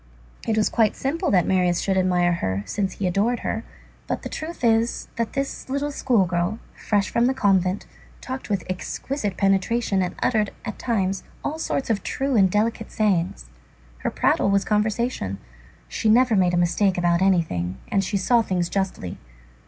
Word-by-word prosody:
It 220 - +1
was 215 - +3
quite 220 -3 +2
simple 325 +7 -1
that 180 -3 +3
Marius 180 -2 +2
should 195 - 0
admire 180 -2 +2
her, 95 - -2
since 195 - -2
he 200 - -4
adored 205 +7 +1
her. 225 - -2 0.4
But - - -3
the - - -5
truth 315 -2 -6
is, 230 0 +2
that 230 -1 -2
this 275 -1 -3
little 280 +2 -1
school 245 -8 +2
girl, 175 +4 -1 0.2
fresh 205 -2 0
from 235 +1 +3
the 260 - +1
convent, 190 -4 +2 0.3
talked 260 -2 -6
with 200 -4 0
exquisite 205 +3 -3
penetration 195 +1 +1
and 180 - -2
uttered, 215 -4 +1
at 220 - -5
times, 195 -5 0 0.2
all 310 +2 -3
sorts 275 -6 -1
of 205 - 0
true 270 -1 -1
and 195 -4 +5
delicate 220 +3 0
sayings. 180 - 0 0.5
Her - - -1
prattle - - +2
was 200 0 +2
conversation. 210 - 0 0.5
She 215 - -1
never 240 +1 +5
made 180 -2 +3
a - - +1
mistake 180 +2 +2
about 175 0 +2
anything, 155 - +1
and 195 - +1
she 200 - -1
saw 235 +5 +3
things 180 -5 -1
justly. 190 - -3
200 Hz, 175 wpm, -23 LUFS, 180-230 Hz, 0.5 s, and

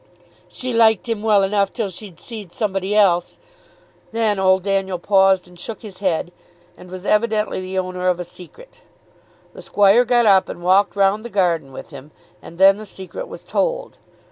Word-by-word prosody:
"She 255 -1 -5
liked 225 -2 +3
him 225 -3 -2
well 210 -2 +3
enough 200 0 +1
till 220 -6 -3
she'd 185 -2 -12
seed 215 -7 -9
somebody 195 -1 -2
else." 180 -4 +2 0.7
Then 220 -3 0
old 190 -1 +3
Daniel 195 -2 -1
paused, 190 0 +3
and 180 -1 -16
shook 225 +6 -7
his 200 -4 -11
head, 175 -3 -1 0.4
and 180 - -14
was 185 +1 -9
evidently 210 -2 0
the 185 +1 -5
owner 185 0 -2
of 180 -1 +1
a 180 - -4
secret. 180 - -14 0.7
The - - -11
squire 205 +4 +4
got 240 -1 +2
up 195 -3 +4
and 175 - -8
walked 195 +3 +3
round 200 +2 +2
the 235 - -7
garden 175 -9 0
with - - -10
him, 140 +1 -11 0.3
and 170 - -13
then 195 +1 +6
the 215 - -9
secret 190 - -8
was - - -10
told. - - -2
195 Hz, 180 wpm, -20 LUFS, 185-215 Hz, 0.7 s, then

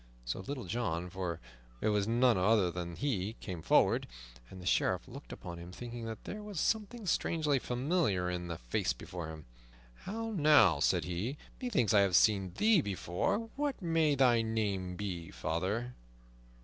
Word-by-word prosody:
So - - -3
Little 130 +5 -5
John, 90 -4 -2
for 90 -3 -3 0.4
it - - +1
was 105 -1 +1
none 120 +1 +4
other 95 -1 +3
than 85 0 -5
he, 110 -6 -1
came 90 -5 -6
forward, - - +3 0.4
and 95 - -10
the 90 - -10
Sheriff - - +1
looked - - -10
upon 85 -1 -7
him, 85 +1 -9
thinking 120 +3 -7
that 110 -1 -6
there 210 - -6
was 210 -5 -5
something 220 +3 -1
strangely 155 -5 +1
familiar 125 - 0
in 90 -1 -3
the 85 -1 -4
face - - -1
before 85 +6 -7
him. 80 -1 -9 0.6
"How, 225 +3 -3
now," 150 - +5
said - - +2
he, 95 +11 -3 0.2
"methinks 200 - +1
I 105 - +7
have 95 -3 +3
seen 95 -2 +4
thee 215 -5 +5
before. 100 - -2
What 285 -2 -1
may 165 -5 +2
thy 125 -4 +4
name 100 -5 -1
be, 90 -4 -4
father?" 95 - -2
105 Hz, 165 wpm, -33 LUFS, 90-145 Hz, 0.6 s, I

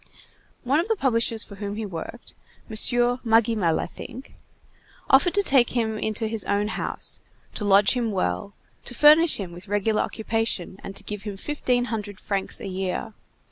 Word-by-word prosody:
One 275 +5 +2
of 345 - -1
the 450 - +1
publishers 230 - +1
for 200 - -12
whom 205 0 -4
he 220 0 -4
worked, 190 +6 -7 0.3
M. 220 - -7 0.5
Magimel, 225 -7 +3
I - - -2
think, 255 +8 -10 0.8
offered 280 +8 +5
to 405 - +3
take 265 -8 +3
him 220 -2 0
into 220 +1 -2
his 220 -1 0
own 205 +1 0
house, - - -4 0.3
to 210 - -3
lodge 200 0 +6
him 240 -3 -1
well, 200 +1 -2 0.3
to 245 - -4
furnish 305 +4 +6
him 190 -4 -5
with 175 +3 -10
regular 205 +2 +1
occupation, 220 -4 -2
and 195 - -7
to - - -7
give 210 -1 -5
him 205 -1 -6
fifteen 250 -1 0
hundred 210 -5 -5
francs 195 -2 -2
a - - -7
year. 190 +3 -3
220 Hz, 175 wpm, -25 LUFS, 200-240 Hz, 0.8 s, lodge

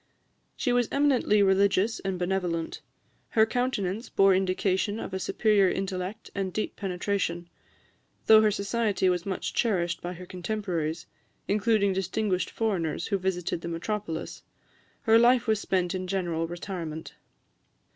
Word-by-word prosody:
She 245 - 0
was 245 -2 +2
eminently 265 -7 +3
religious 200 +2 +3
and 190 -1 -3
benevolent. 175 -2 -2 0.5
Her 220 -1 +4
countenance 225 -3 -2
bore 195 0 +4
indication 190 +2 0
of 190 - -6
a 190 - -2
superior 205 -1 +3
intellect 190 +3 -4
and 195 -2 -2
deep 215 - -3
penetration. 180 -2 -2 0.8
Though 220 0 +8
her 215 - +4
society 200 -1 0
was 180 +1 -1
much 190 - -3
cherished 175 -7 0
by 175 +1 -4
her 180 +1 -9
contemporaries, 175 -4 -3 0.4
including 205 -1 +2
distinguished 190 0 -1
foreigners 175 -8 -1
who 200 -2 +1
visited 180 -3 -2
the - - -6
metropolis, 170 0 -4 0.6
her 225 0 +5
life 240 +1 +5
was 220 -2 +2
spent 180 -2 0
in 185 0 -3
general 175 -3 -1
retirement. 170 -2 -6
190 Hz, 135 wpm, -27 LUFS, 180-215 Hz, 0.8 s, Though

